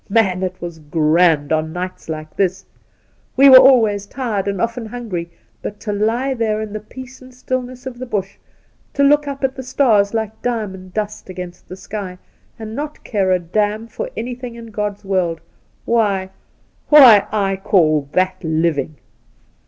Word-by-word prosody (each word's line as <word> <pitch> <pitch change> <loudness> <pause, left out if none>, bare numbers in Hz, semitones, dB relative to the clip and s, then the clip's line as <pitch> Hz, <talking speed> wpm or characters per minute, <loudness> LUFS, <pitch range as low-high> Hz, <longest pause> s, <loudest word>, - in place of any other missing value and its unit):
Man, 195 -4 +2
it 185 -1 -3
was 170 -2 -7
grand 155 0 +2
on 160 0 -1
nights 180 -1 -6
like 155 -1 -6
this! 190 -1 -1 0.7
We 275 +1 +8
were 260 -1 +11
always 220 -7 +4
tired 220 -7 -3
and 200 -2 -2
often 230 +2 -2
hungry; 210 -8 -5 0.3
but 205 - -6
'to 210 -2 -4
lie 230 +6 0
there 220 -3 -1
in 215 -1 -5
the 215 - -3
peace 255 +4 -12
and 255 0 -14
stillness 255 0 -5
of 250 -2 -7
the 255 - -6
Bush, 195 -4 -3 0.6
to 280 - +2
look 295 +1 +4
up 280 0 -5
at 265 -1 +1
the 265 - -6
stars 235 -6 +2
like 220 -1 -3
diamond 190 -6 -4
dust 215 -2 -4
against 180 -1 -9
the 185 - -7
sky, 195 -1 -6 0.4
and 220 0 -7
not 295 +2 -6
care 195 -4 0
a 185 - +4
damn 210 +5 -1
for - - -5
anything 245 0 -5
in 230 -1 -10
God's 210 -1 -4
world, 180 -4 0 0.5
why 200 -5 +1 0.3
— - - -39
why 255 -9 +8
— - - -23
I 195 -2 0
caU 155 -7 +2
that 185 0 0
living 160 -2 -1
205 Hz, 175 wpm, -19 LUFS, 185-240 Hz, 0.7 s, were